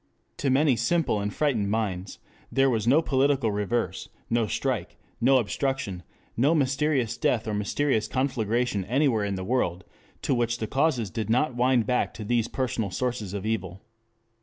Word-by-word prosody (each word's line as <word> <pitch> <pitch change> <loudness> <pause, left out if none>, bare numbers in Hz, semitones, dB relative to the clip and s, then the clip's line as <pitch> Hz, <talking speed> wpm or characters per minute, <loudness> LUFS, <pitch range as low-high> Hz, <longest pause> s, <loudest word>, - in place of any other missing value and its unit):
To 140 - 0
many 135 0 +4
simple 165 -5 +1
and 100 0 -2
frightened 115 -7 0
minds 100 -3 -2 0.3
there 135 0 +3
was 110 -2 -1
no 150 +7 +5
political 135 -4 +2
reverse, 105 +4 -2 0.2
no 115 -1 +2
strike, - - -2 0.2
no 130 +3 +5
obstruction, 125 -4 -2 0.3
no 140 +8 +3
mysterious 135 -4 +1
death 125 -8 0
or 110 - -1
mysterious 110 +3 0
conflagration 120 -5 0
anywhere 125 -2 +2
in 100 -1 -1
the 95 - -4
world 95 -5 0 0.4
of 135 - +3
which 120 0 0
the 110 - -3
causes 130 - 0
did 110 +1 -3
not 125 +4 +2
wind 125 -1 +3
back 125 +3 0
to 110 - -6
these 115 +1 +1
personal 115 -5 -2
sources 110 -1 -3
of 100 0 -4
evil. 95 -3 -3
120 Hz, 160 wpm, -26 LUFS, 105-135 Hz, 0.4 s, no